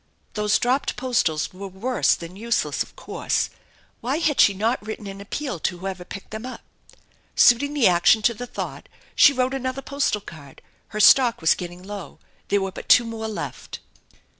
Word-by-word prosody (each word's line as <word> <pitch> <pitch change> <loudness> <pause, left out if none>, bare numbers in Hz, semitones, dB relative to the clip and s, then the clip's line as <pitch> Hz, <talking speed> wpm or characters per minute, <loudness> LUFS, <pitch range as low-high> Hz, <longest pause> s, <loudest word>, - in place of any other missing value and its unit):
Those 210 -1 +2
dropped 255 +3 0
postals 205 -13 0
were 195 +2 -7
worse 220 +7 +1
than 170 +2 -10
useless, 230 +3 -1
of - - -5
course. - - -2 0.5
Why 260 +5 -1
had 310 -4 +2
she 200 - +5
not 220 +4 0
written 215 0 -7
an 195 0 -8
appeal 250 - -4
to 180 +3 -2
whoever 185 0 -5
picked 195 +2 -10
them 220 +1 -6
up? 255 0 -7 0.7
Suiting 285 +5 +5
the 275 -6 +3
action 180 +5 +4
to 235 - +3
the 245 +3 -7
thought - - -7 0.3
she 290 0 +7
wrote 255 -1 0
another 265 0 -3
postal 280 -6 -1
card 145 -7 -13 0.2
her 215 - -6
stock 240 +2 +6
was 160 - +4
getting 175 0 -8
low, 200 -2 -8 0.3
there 200 0 +1
were 195 0 -2
but - - -10
two 240 - +7
more 225 -1 -5
left. 215 - -6
220 Hz, 180 wpm, -23 LUFS, 190-255 Hz, 0.7 s, she